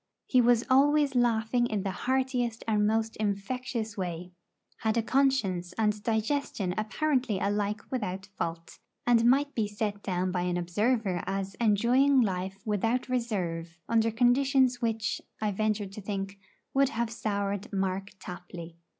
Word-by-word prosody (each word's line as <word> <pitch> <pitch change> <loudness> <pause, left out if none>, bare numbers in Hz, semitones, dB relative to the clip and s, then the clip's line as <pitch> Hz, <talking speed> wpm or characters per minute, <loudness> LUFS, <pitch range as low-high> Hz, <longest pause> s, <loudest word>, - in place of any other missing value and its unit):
He 255 - +4
was 240 -1 +4
always 285 +1 +4
laughing 240 0 +2
in 210 -4 -2
the 195 - -1
heartiest 250 0 -1
and 210 -2 +2
most 225 +1 0
infectious 220 +2 -2
way; 180 -2 -4 0.5
had 220 0 0
a 230 - +2
conscience 220 -10 +1
and 210 0 0
digestion 220 -3 -1
apparently 250 0 0
alike 205 +2 -1
without 190 -7 -3
fault, 165 0 -5 0.3
and 235 -1 +4
might 285 +3 +3
be 220 -3 0
set 205 0 -3
down 185 -1 -1
by 180 -1 -1
an 175 0 0
observer 195 +1 0
as 195 0 -2
enjoying 245 +6 +4
life 190 -3 -1
without 225 +5 0
reserve 175 -9 -2
under 230 -1 +3
conditions 250 +2 +3
which, 225 -2 -1 0.2
I 215 -1 0
venture 215 +1 0
to 195 +2 -9
think, 195 0 -4 0.3
would 275 -1 +4
have 230 -1 -2
soured 200 -2 -2
Mark 195 0 -1
Tapley. 175 -2 -9
215 Hz, 140 wpm, -29 LUFS, 195-245 Hz, 0.5 s, He